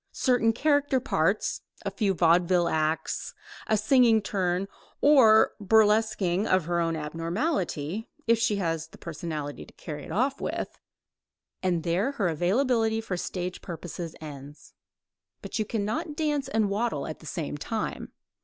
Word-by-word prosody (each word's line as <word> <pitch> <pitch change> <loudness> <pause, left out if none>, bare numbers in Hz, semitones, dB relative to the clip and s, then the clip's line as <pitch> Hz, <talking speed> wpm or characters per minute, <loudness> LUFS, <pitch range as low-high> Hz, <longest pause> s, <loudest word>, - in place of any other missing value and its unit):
Certain 245 -3 +3
character 285 +2 +2
parts, 195 -5 0 0.2
a - - -1
few 200 -5 0
vaudeville 175 +1 +3
acts, 155 0 -1 0.3
a 220 - +3
singing 230 +1 +5
turn, 190 -2 -1 0.3
or 250 -7 +6
a - - -9
burlesquing 210 -3 +3
of 185 -3 +2
her 175 +1 0
own 165 -1 0
abnormality 165 - -2 0.2
(if 230 0 +3
she 225 -2 +2
has 165 -5 -2
the - - -16
personality 155 -3 -5
to - - -16
carry 150 -4 -7
it - - -9
off 265 +5 0
with), - - -4 0.8
and 175 -3 0
there 185 +11 0
her 200 -10 0
availability 220 - +1
for 220 -4 -3
stage 180 +1 -4
purposes 170 -1 -7
ends. 145 -1 -10 0.7
But 200 +2 -4
you 215 - +1
cannot 225 - -2
dance 295 -3 0
and 220 -6 +1
waddle 205 -8 -1
at 155 - -6
the 155 - -12
same 155 -3 -4
time. 220 +9 -4
195 Hz, 145 wpm, -27 LUFS, 165-225 Hz, 0.8 s, or